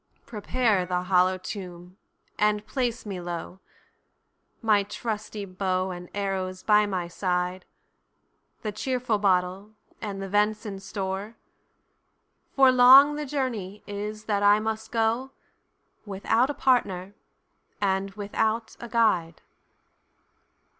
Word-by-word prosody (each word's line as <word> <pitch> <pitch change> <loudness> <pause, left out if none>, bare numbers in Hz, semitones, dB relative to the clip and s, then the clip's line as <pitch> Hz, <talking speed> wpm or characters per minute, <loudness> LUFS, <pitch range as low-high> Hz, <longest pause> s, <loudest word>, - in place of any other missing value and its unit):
Prepare 220 -2 0
the 180 0 -2
hollow 185 0 +3
tomb, 180 -2 -8 0.4
and 210 0 +2
place 245 -4 -2
me 195 -3 -5
low, 175 +1 -6 1.0
My 215 -3 +3
trusty 210 0 -5
bow 185 0 -1
and 180 -1 -8
arrows 190 -2 -3
by 210 -1 +4
my 185 -3 -2
side, 180 +1 -2 1.0
The 215 - -2
cheerful 245 0 -1
bottle, 190 +2 0 0.3
and 200 -3 -5
the 195 - -4
ven'son 210 0 0
store; 195 +2 -5 1.2
For 265 -1 +7
long 260 +3 +8
the 295 0 -4
journey 230 -8 -3
is 210 +1 -5
that 205 -2 0
I 205 +1 +5
must 220 0 -4
go, 230 +3 0 0.7
Without 205 +6 +1
a 290 - -3
partner, 200 -7 +1 0.7
and 195 -1 0
without 220 +2 -1
a 235 - -8
guide." 185 -8 +1
205 Hz, 115 wpm, -26 LUFS, 185-225 Hz, 1.2 s, long